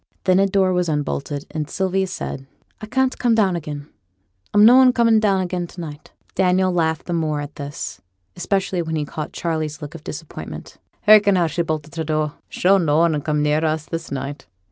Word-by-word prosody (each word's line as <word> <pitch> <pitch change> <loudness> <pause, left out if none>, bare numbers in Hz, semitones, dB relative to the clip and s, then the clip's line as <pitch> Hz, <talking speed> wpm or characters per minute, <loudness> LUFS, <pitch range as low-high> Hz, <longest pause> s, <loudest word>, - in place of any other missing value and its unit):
Then 185 -1 +4
a 195 - +4
door 190 -1 +2
was 180 -1 0
unbolted, 145 -1 -2
and 155 -1 -4
Sylvia 190 +1 0
said, 140 -6 -6 0.3
'I 215 - -7
can't 265 +3 0
come 240 -2 +3
down 195 -5 +2
again. 150 -3 -6 0.6
I'm 205 +1 +6
noan 255 +2 +7
comin' 230 -2 +4
down 200 -3 +2
again 180 -1 -3
to 175 - -13
night.' 155 -3 -8 0.2
Daniel 185 0 +2
laughed 160 -2 0
the 175 - -3
more 155 -3 0
at 145 0 -7
this, 140 -9 -6 0.3
especially 185 0 -1
when 160 -1 -3
he 150 -1 -1
caught 155 +2 -6
Charley's 155 -3 -3
look 150 0 -8
of 165 -2 -10
disappointment. 160 +1 -8 0.2
'Hearken 210 -2 +6
how 175 -2 +3
she's 170 +2 -1
bolted 155 -1 -4
her 160 - -1
door. 155 -1 -1 0.2
She'll 195 +2 +3
noane 160 -1 +2
come 150 0 0
near 150 +1 +1
us 155 -1 0
this 165 0 -5
night. 140 0 -5
165 Hz, 190 wpm, -21 LUFS, 150-190 Hz, 0.6 s, noan